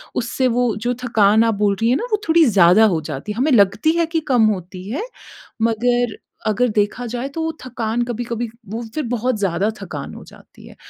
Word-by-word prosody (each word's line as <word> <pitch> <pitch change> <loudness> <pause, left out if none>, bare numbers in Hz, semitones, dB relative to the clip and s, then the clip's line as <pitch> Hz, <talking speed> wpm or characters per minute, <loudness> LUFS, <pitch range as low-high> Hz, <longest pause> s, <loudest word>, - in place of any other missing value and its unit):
उससे 245 +2 0
वो 245 -3 +1
जो 245 - +2
थकान 220 -2 +4
आप 225 -2 +1
बोल 200 -1 +1
रही 225 - +3
हैं 250 - +3
ना - - -3
वो 425 -1 +1
थोड़ी 325 0 +6
ज़्यादा 200 -2 +5
हो 160 - -2
जाती 145 +9 -5
है, 215 - -12
हमें 285 +5 +1
लगती 205 +7 +4
है 335 - +3
कि - - +4
कम 240 -3 +5
होती 185 0 -9
है, 295 - -2 0.6
मगर 235 0 +1 0.3
अगर 225 +4 +2
देखा 210 +4 0
जाए 245 +2 -3
तो 325 +4 -5
वो 320 - -1
थकान 235 -2 -2
कभी-कभी 235 0 -3 0.2
वो 225 +2 -4
फिर 310 - -1
बहुत 245 0 0
ज़्यादा 195 +1 0
थकान 150 -7 -7
हो - - -10
जाती - - -17
है, - - -14
230 Hz, 210 wpm, -20 LUFS, 205-250 Hz, 0.6 s, थोड़ी